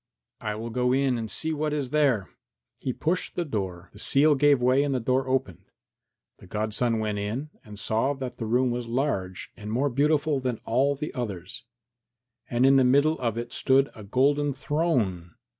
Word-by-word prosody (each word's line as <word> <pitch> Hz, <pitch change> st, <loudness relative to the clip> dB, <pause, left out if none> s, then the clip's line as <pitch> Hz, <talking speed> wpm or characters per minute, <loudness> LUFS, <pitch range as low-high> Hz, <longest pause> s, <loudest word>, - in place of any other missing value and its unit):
I 105 Hz, -1 st, -3 dB
will 115 Hz, +2 st, -5 dB
go 125 Hz, +1 st, +1 dB
in 130 Hz, -2 st, +2 dB
and 110 Hz, -1 st, -4 dB
see 160 Hz, +11 st, -2 dB
what 150 Hz, 0 st, -1 dB
is 140 Hz, -4 st, -2 dB
there." 140 Hz, -10 st, +2 dB, 0.5 s
He 130 Hz, -, -2 dB
pushed 165 Hz, +8 st, -1 dB
the 175 Hz, -, -1 dB
door; 95 Hz, -, -4 dB
the 105 Hz, -, -13 dB
seal 150 Hz, +6 st, +4 dB
gave 145 Hz, -1 st, +4 dB
way 130 Hz, +2 st, +3 dB
and 140 Hz, -2 st, 0 dB
the -, -, +1 dB
door 130 Hz, +3 st, 0 dB
opened. 130 Hz, -9 st, -2 dB, 0.7 s
The -, -, -14 dB
godson 110 Hz, +3 st, -1 dB
went 105 Hz, -2 st, -1 dB
in 120 Hz, +9 st, -4 dB
and 105 Hz, -1 st, -11 dB
saw 115 Hz, +6 st, 0 dB
that 130 Hz, -2 st, -6 dB
the 115 Hz, -, -3 dB
room 125 Hz, +2 st, +2 dB
was 120 Hz, 0 st, -3 dB
large 115 Hz, -8 st, -2 dB
and 105 Hz, 0 st, -7 dB
more 135 Hz, +5 st, +1 dB
beautiful 145 Hz, +2 st, +2 dB
than 125 Hz, -3 st, -2 dB
all 135 Hz, +5 st, +2 dB
the 150 Hz, +2 st, -5 dB
others, 115 Hz, -, -5 dB, 0.8 s
and 120 Hz, +2 st, +2 dB
in 135 Hz, 0 st, +6 dB
the 135 Hz, -, +5 dB
middle 140 Hz, +5 st, +3 dB
of 115 Hz, -3 st, -1 dB
it 120 Hz, -, -5 dB
stood 135 Hz, +1 st, +3 dB
a 110 Hz, -, -11 dB
golden 140 Hz, +7 st, +2 dB
throne. 120 Hz, -, -1 dB
125 Hz, 190 wpm, -26 LUFS, 110-140 Hz, 0.8 s, in